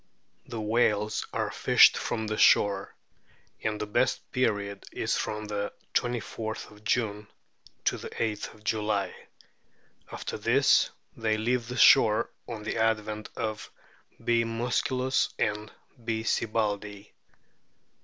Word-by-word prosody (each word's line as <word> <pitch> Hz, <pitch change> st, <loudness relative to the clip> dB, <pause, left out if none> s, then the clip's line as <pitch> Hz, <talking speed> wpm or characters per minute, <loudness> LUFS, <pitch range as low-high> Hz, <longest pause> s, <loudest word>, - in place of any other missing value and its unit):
The 115 Hz, -, -5 dB
whales 105 Hz, -1 st, +1 dB
are -, -, -2 dB
fished -, -, +6 dB
from 110 Hz, -, -2 dB
the 110 Hz, 0 st, -2 dB
shore, 100 Hz, -1 st, +4 dB, 0.7 s
and 105 Hz, -1 st, -1 dB
the 105 Hz, -, -2 dB
best 105 Hz, -, 0 dB
period 100 Hz, -5 st, -1 dB
is -, -, -1 dB
from 105 Hz, 0 st, -3 dB
the 105 Hz, -1 st, -3 dB, 0.2 s
24th 110 Hz, -2 st, -3 dB
June 105 Hz, -1 st, -1 dB, 0.6 s
to -, -, +1 dB
the -, -, -7 dB
8th 105 Hz, -1 st, -4 dB
July; 105 Hz, -3 st, -1 dB, 1.0 s
after -, -, -5 dB
this -, -, +4 dB, 0.3 s
they 110 Hz, -1 st, 0 dB
leave 120 Hz, +2 st, 0 dB
the 125 Hz, +1 st, -5 dB
shore 110 Hz, 0 st, +6 dB, 0.2 s
on 115 Hz, -3 st, -6 dB
the 110 Hz, -, -3 dB
advent 110 Hz, -1 st, 0 dB
of 110 Hz, -1 st, -4 dB, 0.6 s
B. 120 Hz, -1 st, +3 dB
musculus 125 Hz, +3 st, 0 dB
and 105 Hz, 0 st, -1 dB, 0.3 s
B. 110 Hz, -1 st, -2 dB
sibbaldii. 105 Hz, -3 st, -1 dB
110 Hz, 115 wpm, -28 LUFS, 105-115 Hz, 1.0 s, fished